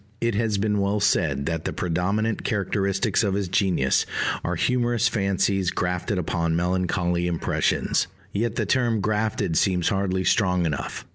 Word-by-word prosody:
It 115 Hz, -1 st, 0 dB
has 105 Hz, 0 st, 0 dB
been 105 Hz, 0 st, 0 dB
well 100 Hz, +1 st, +1 dB
said 75 Hz, -8 st, +1 dB
that 80 Hz, 0 st, -2 dB
"the -, -, -1 dB
predominant 100 Hz, +6 st, -1 dB
characteristics 100 Hz, 0 st, 0 dB
of 100 Hz, -2 st, 0 dB
his 100 Hz, -2 st, -1 dB
genius 90 Hz, -, +1 dB, 0.4 s
are -, -, -1 dB
humorous 120 Hz, -2 st, +1 dB
fancies 95 Hz, -3 st, +1 dB
grafted 90 Hz, +3 st, -2 dB
upon 85 Hz, -1 st, -1 dB
melancholy 90 Hz, 0 st, 0 dB
impressions." 85 Hz, 0 st, 0 dB, 0.3 s
Yet 110 Hz, +2 st, -1 dB
the -, -, 0 dB
term 120 Hz, -4 st, +1 dB
"grafted" 105 Hz, -5 st, 0 dB
seems 90 Hz, -3 st, +1 dB
hardly 95 Hz, -1 st, 0 dB
strong 90 Hz, -3 st, +2 dB
enough. 75 Hz, -4 st, -4 dB
95 Hz, 145 wpm, -24 LUFS, 90-105 Hz, 0.4 s, strong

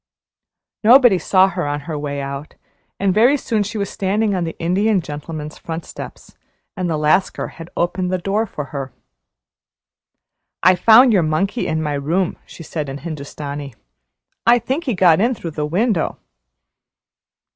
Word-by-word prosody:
Nobody 240 Hz, -4 st, +6 dB
saw 190 Hz, +1 st, +4 dB
her 175 Hz, -4 st, -3 dB
on 145 Hz, 0 st, -2 dB
her 155 Hz, +2 st, -6 dB
way 145 Hz, -1 st, -4 dB
out, 140 Hz, +2 st, -6 dB, 0.4 s
and 195 Hz, -1 st, +2 dB
very 240 Hz, +8 st, +4 dB
soon 225 Hz, -5 st, -1 dB
she 210 Hz, +2 st, -3 dB
was 200 Hz, -1 st, -1 dB
standing 205 Hz, +2 st, 0 dB
on 180 Hz, -2 st, -1 dB
the 165 Hz, -, -6 dB
Indian 195 Hz, +5 st, +1 dB
Gentleman's 150 Hz, -1 st, -7 dB
front 165 Hz, 0 st, -6 dB
steps, -, -, -10 dB, 0.4 s
and 185 Hz, -3 st, -2 dB
the 160 Hz, -, 0 dB
Lascar 155 Hz, +5 st, +1 dB
had 165 Hz, +1 st, -11 dB
opened 180 Hz, +1 st, -1 dB
the 185 Hz, -, +1 dB
door 200 Hz, +5 st, -1 dB
for 150 Hz, -6 st, -6 dB
her. 135 Hz, -2 st, -4 dB, 1.7 s
"I 185 Hz, -, +7 dB
found 225 Hz, +6 st, +6 dB
your 190 Hz, -, +4 dB
monkey 190 Hz, +9 st, -1 dB
in 160 Hz, 0 st, -1 dB
my 150 Hz, -1 st, -2 dB
room," 165 Hz, +6 st, -1 dB
she 165 Hz, -, -11 dB
said 150 Hz, -2 st, -4 dB
in 135 Hz, -, -5 dB
Hindustani. 145 Hz, -3 st, -7 dB, 0.7 s
"I 240 Hz, +1 st, +5 dB
think 265 Hz, +8 st, -3 dB
he 250 Hz, -6 st, 0 dB
got 180 Hz, -1 st, +4 dB
in 240 Hz, +3 st, +2 dB
through 170 Hz, -6 st, -6 dB
the 150 Hz, -1 st, -3 dB
window." 190 Hz, +2 st, 0 dB
175 Hz, 160 wpm, -19 LUFS, 150-205 Hz, 1.7 s, I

